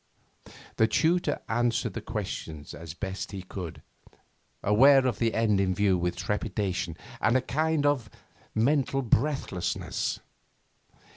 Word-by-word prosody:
The 110 Hz, -, +5 dB
tutor 165 Hz, +9 st, +1 dB
answered 120 Hz, 0 st, 0 dB
the -, -, -4 dB
questions 75 Hz, -2 st, -5 dB
as 80 Hz, 0 st, -8 dB
best 95 Hz, +1 st, -4 dB
he 95 Hz, -3 st, -6 dB
could, 90 Hz, -3 st, -7 dB, 0.8 s
aware 130 Hz, +6 st, +6 dB
of 125 Hz, -5 st, 0 dB
the 115 Hz, -1 st, +1 dB
end 110 Hz, -3 st, +3 dB
in 95 Hz, -1 st, +1 dB
view 100 Hz, 0 st, +3 dB
with 90 Hz, 0 st, -1 dB
trepidation 90 Hz, -2 st, -2 dB, 0.2 s
and 115 Hz, +3 st, +4 dB
a -, -, +1 dB
kind 155 Hz, +3 st, 0 dB
of 135 Hz, -7 st, +1 dB, 0.5 s
mental 135 Hz, +3 st, +2 dB
breathlessness. 115 Hz, -, -1 dB
110 Hz, 125 wpm, -28 LUFS, 95-135 Hz, 0.8 s, aware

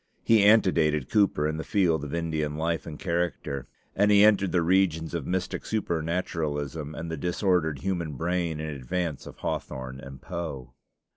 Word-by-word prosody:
He 110 Hz, -2 st, +5 dB
antedated 85 Hz, -, +4 dB
Cooper 100 Hz, -8 st, +3 dB
in 80 Hz, 0 st, -2 dB
the 80 Hz, -, -3 dB
field 85 Hz, -7 st, +1 dB
of 75 Hz, -, -5 dB
Indian 80 Hz, -3 st, -2 dB
life 80 Hz, +1 st, -1 dB
and 75 Hz, -2 st, -6 dB
character; 85 Hz, -7 st, -2 dB, 0.3 s
and 100 Hz, +2 st, +3 dB
he 105 Hz, 0 st, +7 dB
entered 100 Hz, -3 st, +4 dB
the 90 Hz, -2 st, +2 dB
regions 85 Hz, -2 st, +2 dB
of 85 Hz, -5 st, -3 dB
mystic 90 Hz, 0 st, -2 dB
supernaturalism 80 Hz, -6 st, -2 dB
and 85 Hz, 0 st, -5 dB
the 80 Hz, -, -3 dB
disordered 85 Hz, -3 st, 0 dB
human 85 Hz, -5 st, -2 dB
brain 85 Hz, +1 st, -1 dB
in 80 Hz, 0 st, -3 dB
advance 75 Hz, +4 st, -3 dB
of -, -, -11 dB
Hawthorne 65 Hz, 0 st, -4 dB
and 70 Hz, -1 st, -10 dB
Poe. 75 Hz, -7 st, -6 dB
80 Hz, 160 wpm, -27 LUFS, 75-90 Hz, 0.3 s, he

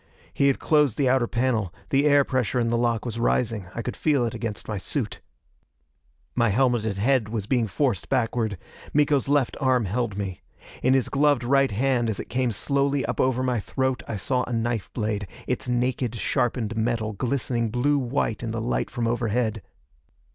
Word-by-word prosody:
He 140 Hz, -, +3 dB
had 135 Hz, -, +3 dB
closed 150 Hz, -6 st, +2 dB
the 140 Hz, -, +2 dB
outer 125 Hz, -2 st, +3 dB
panel; 115 Hz, -6 st, 0 dB, 0.2 s
the 140 Hz, +1 st, +3 dB
air 145 Hz, -1 st, +5 dB
pressure 130 Hz, -2 st, 0 dB
in 115 Hz, -1 st, +1 dB
the 120 Hz, -, +2 dB
lock 120 Hz, -2 st, 0 dB
was 115 Hz, -1 st, -4 dB
rising. 115 Hz, -4 st, 0 dB
I 115 Hz, -, -3 dB
could 125 Hz, -, -4 dB
feel 145 Hz, -6 st, +2 dB
it 115 Hz, -, -3 dB
against 115 Hz, -2 st, -5 dB
my 110 Hz, -, -3 dB
suit. -, -, -2 dB, 1.1 s
My 115 Hz, -2 st, +2 dB
helmeted 110 Hz, -2 st, +1 dB
head 115 Hz, +1 st, +2 dB
was 110 Hz, -3 st, -3 dB
being 120 Hz, 0 st, +1 dB
forced 110 Hz, -, -1 dB
backward; 115 Hz, -5 st, 0 dB, 0.4 s
Miko's 145 Hz, -2 st, +3 dB
left 145 Hz, -3 st, +2 dB
arm 130 Hz, -4 st, +3 dB
held 105 Hz, +1 st, -2 dB
me. 95 Hz, -4 st, -4 dB, 0.4 s
In 130 Hz, +1 st, +4 dB
his 130 Hz, -, +2 dB
gloved 145 Hz, -3 st, +2 dB
right 135 Hz, +2 st, +3 dB
hand 120 Hz, +2 st, +1 dB
as 105 Hz, -, -3 dB
it -, -, -6 dB
came 125 Hz, -1 st, 0 dB
slowly 140 Hz, +5 st, 0 dB
up -, -, -1 dB
over 130 Hz, 0 st, +1 dB
my 125 Hz, -2 st, +1 dB
throat 130 Hz, +4 st, -1 dB
I 115 Hz, -, -3 dB
saw 125 Hz, +5 st, 0 dB
a -, -, -7 dB
knife 115 Hz, -2 st, -1 dB
blade, 105 Hz, -3 st, -2 dB, 0.2 s
its -, -, -2 dB
naked, 125 Hz, -1 st, 0 dB
sharpened 115 Hz, -1 st, -1 dB
metal 110 Hz, -1 st, -1 dB
glistening 120 Hz, 0 st, -1 dB
blue 140 Hz, +6 st, +2 dB
white 120 Hz, -3 st, -1 dB
in 115 Hz, -, -3 dB
the 115 Hz, +1 st, -3 dB
light 115 Hz, +2 st, -1 dB
from 120 Hz, -3 st, -2 dB
overhead. 115 Hz, -2 st, 0 dB
120 Hz, 185 wpm, -25 LUFS, 110-130 Hz, 1.1 s, air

